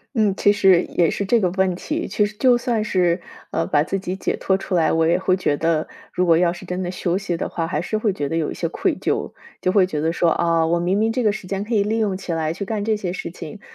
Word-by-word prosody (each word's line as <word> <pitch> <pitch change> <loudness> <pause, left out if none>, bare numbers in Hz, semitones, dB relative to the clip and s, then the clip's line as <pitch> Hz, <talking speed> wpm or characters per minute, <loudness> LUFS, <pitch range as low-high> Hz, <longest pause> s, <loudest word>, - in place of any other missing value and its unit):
嗯， 210 -3 +2
其 205 - +4
实 190 -3 +4
也 170 -2 +2
是 200 - -2
这 230 +4 +3
个 185 -3 +1
问 190 -1 +1
题， 310 - -3
确 210 - +1
实 210 +1 -7
就 250 -1 +4
算 235 -3 -1
是， 180 -3 +1 0.3
呃， 165 - 0
把 145 - +2
自 185 +5 -1
己 185 -1 -4
解 - - -1
脱 190 - 0
出 195 -1 -3
来， 165 -2 +3
我 165 0 +2
也 170 +2 +3
会 185 0 +1
觉 150 -5 +1
得 160 0 0 0.2
如 180 - 0
果 165 -2 +5
要 175 -1 +3
是 175 - -9
真 180 +1 -3
的 175 - -3
休 180 0 -1
息 180 -4 -3
的 - - -2
话， 165 - -3
还 160 -2 -2
是 215 - -2
会 215 -1 +1
觉 145 -6 -3
得 165 - -3
有 165 -2 -1
一 - - -4
些 - - -2
愧 - - 0
疚， - - -2 0.3
就 185 - +1
会 185 -2 +4
觉 150 -5 -3
得 160 +1 +1
说， 170 0 +2
啊， 165 -1 +2
我 170 +1 +1
明 190 +4 +1
明 225 +1 +1
这 250 0 0
个 210 - +4
时 200 -3 -7
间 195 +1 -2
可 230 +3 -5
以 205 - +3
利 220 +2 -1
用 205 -4 0
起 175 -3 -5
来 160 -1 -1
去 195 +3 -5
干 210 -1 -2
这 220 0 +1
些 180 -4 -3
事 170 -3 -5
情， 205 +3 -9
185 Hz, 315 characters per minute, -21 LUFS, 170-205 Hz, 0.3 s, 果